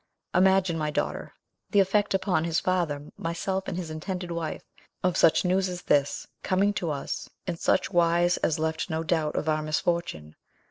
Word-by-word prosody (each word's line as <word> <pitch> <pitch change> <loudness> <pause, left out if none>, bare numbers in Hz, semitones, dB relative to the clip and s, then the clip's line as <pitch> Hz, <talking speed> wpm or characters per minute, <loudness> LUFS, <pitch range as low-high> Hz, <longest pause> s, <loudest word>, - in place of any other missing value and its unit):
Imagine, 185 -2 +3
my 155 -1 0
daughter, 150 - -2 0.4
the 205 - +3
effect 200 +1 +2
upon 190 -4 +1
his 165 0 +1
father, 155 -6 -1
myself, 190 +3 -2
and 175 - -3
his 170 -3 -4
intended 180 +2 -4
wife, 165 -2 -4 0.4
of 180 -1 +2
such 165 - +4
news 185 +1 +2
as 180 -1 -6
this, 145 -1 +1 0.2
coming 195 +2 +2
to 175 -5 -2
us 140 -2 -4 0.2
in 180 -2 -2
such 165 - +1
wise 175 0 +3
as 160 - 0
left 160 +2 -2
no 160 0 -1
doubt 160 -2 0
of - - -1
our 155 0 +2
misfortune. 155 - -2
170 Hz, 175 wpm, -27 LUFS, 155-185 Hz, 0.4 s, such